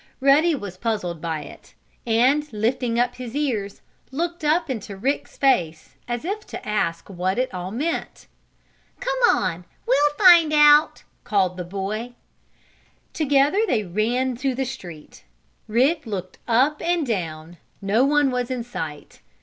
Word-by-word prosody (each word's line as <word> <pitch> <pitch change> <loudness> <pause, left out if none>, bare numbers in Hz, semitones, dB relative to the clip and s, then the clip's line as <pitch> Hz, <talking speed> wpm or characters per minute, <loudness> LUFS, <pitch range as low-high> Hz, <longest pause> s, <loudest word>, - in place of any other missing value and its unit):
Ruddy 295 +5 +4
was 200 -8 -7
puzzled 185 -7 -3
by 160 -2 -3
it - - -14 0.3
and, 265 +7 +2
lifting 235 +2 -1
up 245 0 +1
his 250 -1 -7
ears, 225 -9 -2 0.3
looked 335 +4 -3
up 325 +3 +2
into 215 -7 -5
Rick's 270 +8 -2
face, 170 - 0
as 240 +3 -4
if 405 +4 -2
to - - -8
ask 170 -6 -1
what 185 0 -2
it 255 -3 -1
all 180 0 -5
meant. 290 - -4 0.7
"Come - - -2
on! 170 +2 0 0.2
We'll 290 +4 +3
find 345 -5 +7
it - - +3
out!" 295 +1 +5 0.2
called 190 -4 +1
the 180 - -5
boy. 205 +6 -5 1.0
Together 290 +4 +2
they 220 - +1
ran 235 +7 -1
to 265 0 -1
the 265 +1 -1
street. 175 -11 -10 0.4
Rick 265 +6 +1
looked 185 -4 -6
up 265 +6 +2
and 340 -2 0
down. 170 -7 -4 0.2
No 205 +5 +2
one 290 -1 +3
was 250 0 -2
in 250 -2 -3
sight. 160 -11 -7
245 Hz, 150 wpm, -23 LUFS, 195-290 Hz, 1.0 s, find